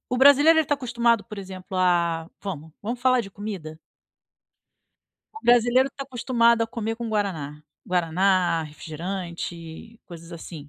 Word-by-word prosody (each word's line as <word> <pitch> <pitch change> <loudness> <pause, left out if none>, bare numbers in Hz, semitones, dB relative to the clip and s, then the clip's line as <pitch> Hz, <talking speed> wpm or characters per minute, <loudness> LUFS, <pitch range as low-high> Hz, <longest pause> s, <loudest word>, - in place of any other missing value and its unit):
o 250 - -1
brasileiro 285 +5 +7
ele 320 - +4
tá 290 - +2
acostumado, 235 -4 +1
por 215 - -10
exemplo, 190 0 -7
a 170 -3 +2 0.2
vamos, 160 -5 -6
vamos 235 +4 -4
falar 255 0 +4
de 200 -4 -8
comida? 190 -7 -7 1.6
O - - -23
brasileiro 245 +2 +4
tá 275 - -7
acostumado 235 -3 +2
a - - 0
comer 225 -1 -4
com 235 0 -5
guaraná. 170 -9 -2 0.3
Guaraná, 180 0 +2
refrigerante, 170 +4 -7
coisas 170 -1 -11
assim. 160 -3 -9
195 Hz, 140 wpm, -24 LUFS, 170-235 Hz, 1.6 s, brasileiro